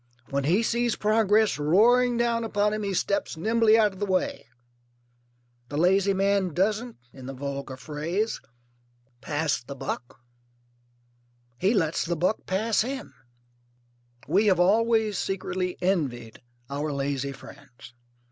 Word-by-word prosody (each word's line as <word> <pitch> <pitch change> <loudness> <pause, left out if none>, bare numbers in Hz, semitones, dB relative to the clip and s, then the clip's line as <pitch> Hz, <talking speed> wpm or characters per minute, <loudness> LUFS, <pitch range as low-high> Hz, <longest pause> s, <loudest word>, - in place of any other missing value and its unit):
When 140 0 -1
he 185 +9 +3
sees 235 0 0
progress 215 -3 +2
roaring 235 +10 +4
down 235 -1 +1
upon 210 -1 0
him 215 - -2
he 200 -1 -2
steps 200 -2 -1
nimbly 225 +4 +3
out 210 -3 +3
of 190 - -13
the 205 - -1
way. 185 -10 -1 1.2
The 145 - -4
lazy 190 +4 +3
man 195 -3 +1
doesn't 215 +6 0 0.2
(in 130 -1 -10
the 135 - -6
vulgar 140 -1 -5
phrase) 160 +10 -3 0.8
pass 150 -1 -1
the 140 +3 -8
buck. 125 -2 -6 1.4
He 195 +6 +2
lets 165 -5 +1
the 170 +1 -2
buck 180 +6 -1
pass 215 +4 +1
him. 260 - -5 1.1
We 195 +8 +3
have 185 -3 +3
always 220 +2 +3
secretly 185 -1 -3
envied 130 - -1 0.3
our 145 +2 -3
lazy 140 -1 -2
friends. 135 -3 -14
190 Hz, 130 wpm, -26 LUFS, 145-215 Hz, 1.4 s, roaring